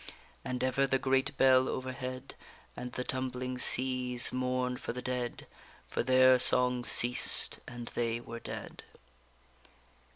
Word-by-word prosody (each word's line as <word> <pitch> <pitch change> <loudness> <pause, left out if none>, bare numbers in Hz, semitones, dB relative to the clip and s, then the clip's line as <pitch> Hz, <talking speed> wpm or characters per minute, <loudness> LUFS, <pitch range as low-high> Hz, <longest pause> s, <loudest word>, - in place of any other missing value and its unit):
_And 125 0 -5
ever 130 +1 0
the 135 - 0
great 135 +1 -1
bell 130 0 +3
overhead, 130 0 -7 0.4
And 125 0 -8
the 125 - -4
tumbling 130 0 -5
seas 125 -1 +2
mourned 125 0 -3
for - - -5
the 125 - -7
dead; 125 -1 -5 0.4
For - - -3
their 130 +1 +4
song 125 0 +4
ceased, 125 +1 +4
and 120 -1 -9
they 115 -1 -3
were 115 -1 -10
dead. - - -9
125 Hz, 130 wpm, -30 LUFS, 125-130 Hz, 0.4 s, their